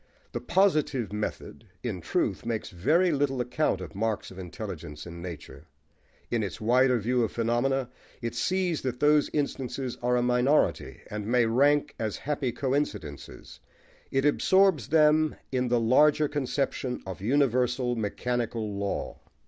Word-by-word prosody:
The - - -4
"positive" 155 - +1
method, 105 0 -5 0.2
in - - -3
truth, - - -1
makes 115 -2 -3
very 160 - +2
little 140 -3 0
account 125 -4 0
of 85 -4 -8
marks 110 0 -2
of 95 - -10
intelligence 75 -4 -7
in 85 -1 -9
nature: 80 -4 -9 0.6
in 115 - +1
its 100 - -4
wider 125 +3 +3
view 120 +3 +1
of 110 - -1
phenomena, 120 +3 0 0.3
it 115 -1 -4
sees 180 +6 0
that 125 -2 -3
those 150 +1 +4
instances 135 -3 -3
are 125 0 +2
a 120 - +1
minority, 125 +4 +1
and 105 0 -4
may 120 0 +3
rank 140 +6 +3
as 110 -2 -2
happy 140 -3 -2
coincidences: 130 - -4 0.5
it 135 +1 0
absorbs 185 - +3
them 155 0 +4 0.2
in 130 -1 0
the 120 0 +2
larger 150 +6 +4
conception 135 -2 -2
of 95 -1 -7
universal 125 0 +1
mechanical 115 0 -2
law. 100 0 -3
125 Hz, 140 wpm, -27 LUFS, 110-145 Hz, 0.6 s, those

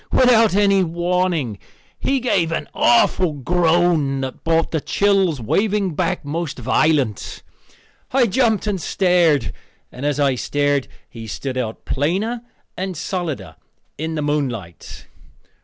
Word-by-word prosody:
Without 230 -5 +4
any 200 -1 +4
warning 170 - -1 0.4
he 270 0 0
gave 190 -10 +1
an 165 - -3
awful 155 +8 +3
groan 160 -1 +1
that 130 -1 -6
brought 165 0 +1
the 160 - -1
chills 195 -6 +1
waving 195 - 0
back 175 +1 -2
most 160 +1 -3
violent. 130 -2 0 0.7
I 260 -1 +4
jumped 220 -1 +1
and 200 -4 -2
stared, 170 - +2 0.4
and 125 - -9
as 145 0 0
I 140 -2 +3
stared 145 +2 0 0.2
he 115 -1 -10
stood 110 - -5
out 115 -4 -4
plainer 195 - -1 0.3
and 185 -2 -4
solider 175 -3 -4 0.4
in 160 +2 -4
the 150 - -2
moonlight. 125 - -4
165 Hz, 125 wpm, -20 LUFS, 140-190 Hz, 0.7 s, Without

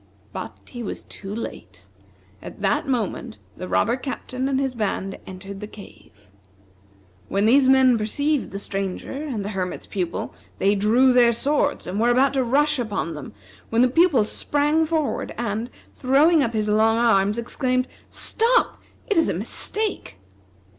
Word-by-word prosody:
But - - -7
he 240 - -8
was 215 - -5
too 195 -1 -9
late. 95 - -7 0.5
At 205 - -10
that 195 +9 +1
moment 240 - -2 0.2
the 185 - -7
robber 230 +5 +2
captain 260 0 -4
and 265 -1 +1
his 270 -2 -1
band 195 -4 -3
entered 195 +1 -8
the 210 - -6
cave. 210 -2 -14 1.2
When 200 +1 +1
these 260 +3 +5
men 260 -3 +5
perceived 285 +7 -1
the 195 - -6
Stranger 195 -1 -4
and 270 -8 -4
the - - -3
Hermit's 185 -3 -4
Pupil, 180 -3 -3 0.2
they 195 +2 +3
drew 230 +6 +4
their 240 -1 +6
swords 285 +4 0
and 190 +3 -3
were 235 +2 +3
about 260 +3 +3
to 265 -2 +1
rush 290 +4 +2
upon 205 -8 -2
them, 150 -7 -8 0.4
when 230 +2 +3
the - - +5
Pupil 320 -4 +4
sprang 295 +8 0
forward 315 -3 -1
and, 230 +1 -2 0.3
throwing 290 +5 +4
up 235 -4 0
his 215 -1 0
long 220 +2 +3
arms, 210 -3 +3
exclaimed: 255 +2 -1 0.2
"Stop! 470 +2 +1 0.2
it 410 - 0
is 325 - +3
a - - -1
mistake!" 420 - -3
235 Hz, 160 wpm, -23 LUFS, 205-275 Hz, 1.2 s, their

